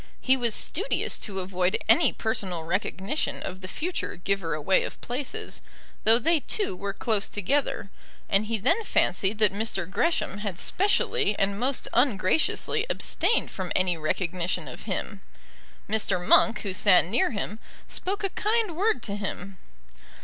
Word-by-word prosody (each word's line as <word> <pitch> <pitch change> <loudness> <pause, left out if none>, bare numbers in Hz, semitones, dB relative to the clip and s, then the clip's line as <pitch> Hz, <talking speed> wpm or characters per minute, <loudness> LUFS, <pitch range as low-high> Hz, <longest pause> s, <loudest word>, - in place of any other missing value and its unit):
He 260 - +3
was 235 -4 +1
studious 405 +10 -1
to 195 -3 -3
avoid 185 0 0
any 225 - +5
personal 190 -7 -2
recognition 190 - -2
of 185 0 -6
the 185 - -6
future 345 - -4
giver 180 -3 -1
away 155 +5 +2
of - - -6
places, 285 - -4 0.4
though 225 +1 +6
they 325 +6 +3
two 400 - -2
were 200 +2 -4
close 210 +1 -1
together; 205 0 -1 0.4
and 200 +2 +1
he 225 0 0
then 260 - +1
fancied 200 - +1
that 210 -2 +4
Mr. 200 -4 -1
Gresham 205 - 0
had 200 -4 -4
specially 400 - +1
and 200 +1 0
most 255 +2 0
ungraciously 250 - +2
abstained 465 - 0
from 185 -2 -5
any 185 -1 +2
recognition 170 +2 -2
of - - -9
him. - - -3 0.7
Mr. 210 -3 +2
Monk, 225 -1 +5
who 195 -3 -3
sat 185 -2 +5
near 215 +8 +2
him, 210 0 -4 0.3
spoke 400 +3 -4
a 390 - +1
kind 430 -4 0
word 395 - +1
to 200 - -3
him. 195 -1 -5
210 Hz, 150 wpm, -26 LUFS, 190-275 Hz, 0.7 s, though